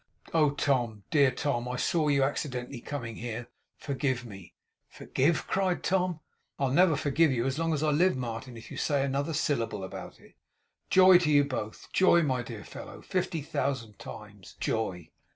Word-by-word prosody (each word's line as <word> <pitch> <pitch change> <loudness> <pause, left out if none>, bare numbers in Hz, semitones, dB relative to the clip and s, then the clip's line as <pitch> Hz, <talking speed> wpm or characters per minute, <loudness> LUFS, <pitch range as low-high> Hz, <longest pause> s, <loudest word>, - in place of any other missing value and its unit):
'Oh, 155 -3 +4
Tom! 120 -7 0
Dear 140 -3 +5
Tom! 125 -1 -2
I 125 - -3
saw 155 +4 +1
you, 140 -2 +3
accidentally, 130 -3 -3
coming 120 -6 -5
here. 120 0 -5 0.3
Forgive 130 -3 -2
me!' 95 -6 -11 0.3
'Forgive!' 155 +5 0
cried 190 -2 0
Tom. 180 -3 0 0.4
'I'll 135 -2 0
never 170 +2 +5
forgive 145 +2 +2
you 120 -2 0
as 135 +3 -1
long 165 0 +1
as 155 -1 0
I 155 - +3
live, 170 +1 +3
Martin, 120 0 -5
if 115 - -12
you - - -7
say 140 -2 +1
another 140 +3 -1
syllable 115 -10 -1
about 95 - -8
it. - - -19 0.6
Joy 185 -1 +8
to 170 -4 0
you 145 -1 +5
both! 130 -6 -5
Joy, 170 -2 +5
my 130 -4 0
dear 115 -3 -8
fellow, - - -10
fifty 170 -4 -2
thousand 130 -7 -3
times.' - - -11
Joy! 90 -7 -2
140 Hz, 170 wpm, -29 LUFS, 120-155 Hz, 0.6 s, Joy